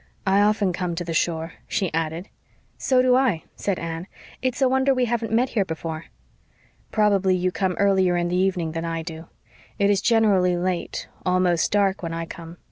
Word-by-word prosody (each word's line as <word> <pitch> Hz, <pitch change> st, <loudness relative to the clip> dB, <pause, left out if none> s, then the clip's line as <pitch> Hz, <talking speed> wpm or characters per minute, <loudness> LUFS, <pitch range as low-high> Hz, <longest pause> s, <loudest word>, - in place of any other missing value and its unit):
"I 195 Hz, +1 st, +4 dB
often 205 Hz, -3 st, +2 dB
come 180 Hz, -1 st, -2 dB
to 175 Hz, -, -3 dB
the 170 Hz, -1 st, -4 dB
shore," 165 Hz, 0 st, -1 dB
she 190 Hz, -5 st, -1 dB
added. 165 Hz, +3 st, -2 dB, 0.5 s
"So 255 Hz, -1 st, +2 dB
do 255 Hz, -1 st, +4 dB
I," 250 Hz, -11 st, +2 dB
said 200 Hz, -3 st, -2 dB
Anne. 165 Hz, +2 st, -5 dB, 0.3 s
"It's 255 Hz, -1 st, -1 dB
a 265 Hz, -, +4 dB
wonder 265 Hz, +1 st, +2 dB
we 255 Hz, -1 st, +2 dB
haven't 230 Hz, -1 st, -2 dB
met 245 Hz, +3 st, +2 dB
here 210 Hz, -, +1 dB
before." 160 Hz, -2 st, -5 dB, 0.9 s
"Probably 200 Hz, -3 st, +3 dB
you 185 Hz, 0 st, 0 dB
come 185 Hz, 0 st, -1 dB
earlier 190 Hz, -2 st, +2 dB
in 175 Hz, 0 st, 0 dB
the 175 Hz, -, -1 dB
evening 180 Hz, -3 st, 0 dB
than 165 Hz, +1 st, -4 dB
I 165 Hz, -1 st, -3 dB
do. 165 Hz, 0 st, -8 dB, 0.5 s
It 200 Hz, 0 st, +3 dB
is 200 Hz, -, +2 dB
generally 200 Hz, -6 st, +3 dB
late 180 Hz, 0 st, -2 dB, 0.2 s
almost 180 Hz, -2 st, +2 dB
dark 200 Hz, -2 st, +2 dB
when 165 Hz, -1 st, -4 dB
I 165 Hz, 0 st, -3 dB
come. 165 Hz, 0 st, -10 dB
185 Hz, 190 wpm, -23 LUFS, 170-205 Hz, 0.9 s, I